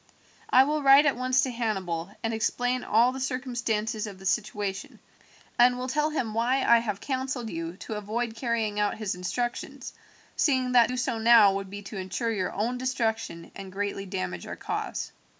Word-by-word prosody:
I 255 - +7
will 300 +2 0
write 275 +1 +7
at 290 - +3
once 255 +2 +2
to 260 - -1
Hannibal 190 -8 -2
and 225 0 -1
explain 245 +3 0
all 235 +4 +4
the 265 - -6
circumstances 240 -4 -2
of 200 -2 -9
the 190 - -12
situation, 195 -1 -2 0.6
and 245 +1 +6
will 250 +1 -4
tell 300 +4 +1
him 245 -8 -2
why 250 +4 +1
I 235 0 +6
have 210 -4 -3
counselled 260 -2 -3
you 165 +1 -5
to 220 - -7
avoid 220 +3 -3
carrying 225 -3 -1
out 210 0 0
his 215 -3 -2
instructions, 240 +7 -4 0.4
seeing 260 -3 +2
that 240 -2 +6
to 250 - -4
do - - -3
so 240 -2 -1
now 225 -3 +7
would 195 0 -4
be 205 +1 -8
to 195 +1 -8
ensure 190 +5 -2
your 190 -4 -1
own 235 +5 -2
destruction 225 -9 -2
and 195 -1 -8
greatly 200 0 -3
damage 90 - -4
our - - -5
cause. - - -4
225 Hz, 185 wpm, -27 LUFS, 200-250 Hz, 0.6 s, I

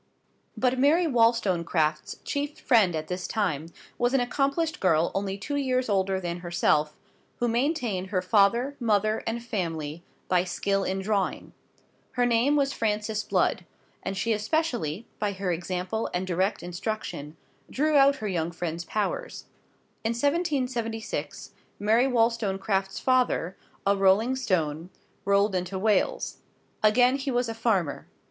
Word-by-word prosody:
But 255 0 +1
Mary 310 +6 +4
Wollstonecraft's 185 - +1
chief 290 +1 -3
friend 215 - +3
at 155 0 -4
this 180 +1 -4
time 170 -8 -1 0.3
was 245 +2 +2
an - - +4
accomplished 280 +6 0
girl 165 -3 +2
only 195 0 -2
two 285 +8 -3
years 255 -3 0
older 190 -1 +1
than 175 -1 -4
herself, 170 -3 +1 0.4
who 240 - 0
maintained 235 - 0
her 185 -2 -1
father, 220 +8 +3
mother, 215 -2 +1
and 230 +1 -2
family 165 -7 -3 0.3
by 180 -1 +3
skill 195 +2 -1
in 190 0 -2
drawing. 200 -1 -1 0.6
Her 245 -1 +2
name 245 +4 +3
was 280 -1 +1
Frances 215 -1 -1
Blood, - - +1 0.4
and 195 0 -4
she 225 +5 +1
especially, 225 - -1
by 205 -1 0
her 190 -1 -2
example 180 +5 -2
and 180 +1 -1
direct 185 +2 0
instruction, 175 -4 -5 0.3
drew 305 +3 +1
out 280 0 +6
her 215 -5 -5
young 170 -4 -1
friend's 170 0 -4
powers. 215 - -3 0.6
In 225 +1 0
1776, 255 -6 -2 0.3
Mary 225 +5 +3
Wollstonecraft's 210 -5 0
father, 250 -8 +1 0.3
a 200 +1 +4
rolling 200 +6 +3
stone, 165 - -1 0.4
rolled 200 +1 +3
into 180 +1 -2
Wales. 210 +2 +1 0.4
Again 245 +5 +4
he 275 0 -4
was 245 -1 +1
a 225 - -3
farmer. 210 -9 0
210 Hz, 140 wpm, -27 LUFS, 185-245 Hz, 0.6 s, out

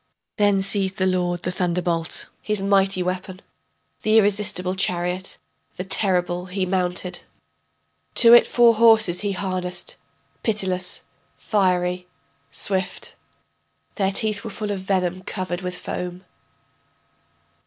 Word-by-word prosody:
Then 205 -2 +3
seized 195 -1 +1
the 185 - +1
lord 180 -1 0
the 180 - -2
thunderbolt, 175 -2 -1 0.2
his 210 -2 -1
mighty 195 -2 +2
weapon, 185 +1 -4 0.6
The 215 +1 +3
irresistible 200 -3 +2
chariot, 180 0 -2 0.4
the 185 - -4
terrible, 180 -2 +1
he 185 +1 -2
mounted, 180 0 -1 0.9
To 235 0 +8
it 240 - +8
four 235 -1 +5
horses 220 -5 +4
he 205 -1 -1
harnessed, 180 -2 -3 0.4
pitiless, 185 -4 -1 0.3
fiery, 180 -3 0 0.4
swift, 190 -1 -3 0.8
Their 195 -2 0
teeth 215 0 0
were 225 - -5
full 210 0 -4
of 200 - -3
venom 185 -1 -1
covered 185 -1 -4
with 180 -1 -4
foam. 180 +1 -6
185 Hz, 115 wpm, -22 LUFS, 180-200 Hz, 0.9 s, To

